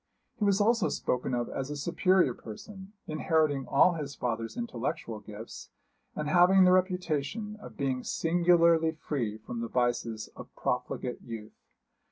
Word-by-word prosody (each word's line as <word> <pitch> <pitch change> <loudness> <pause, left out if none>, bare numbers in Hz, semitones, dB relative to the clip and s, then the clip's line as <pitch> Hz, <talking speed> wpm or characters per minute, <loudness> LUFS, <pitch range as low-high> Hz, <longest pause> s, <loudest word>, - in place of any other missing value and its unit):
He 210 - +2
was 200 0 +3
also 225 0 +3
spoken 125 0 -1
of 120 -1 -1
as 135 0 -4
a 150 - -4
superior 170 0 +2
person, 190 - -10
inheriting 155 -3 +1
all 175 +6 +5
his 145 -4 -5
father's 115 - -3
intellectual 165 - -3
gifts, 105 +2 -10 0.5
and 150 - -3
having 180 +4 +6
the 180 - +6
reputation 185 +2 0
of - - -11
being 130 -2 -1
singularly 170 -1 +3
free 125 -9 -3
from 115 +2 -7
the 115 - -2
vices 120 -2 -1
of - - -10
profligate 125 - -2
youth. 110 -2 -8
150 Hz, 145 wpm, -29 LUFS, 120-180 Hz, 0.5 s, having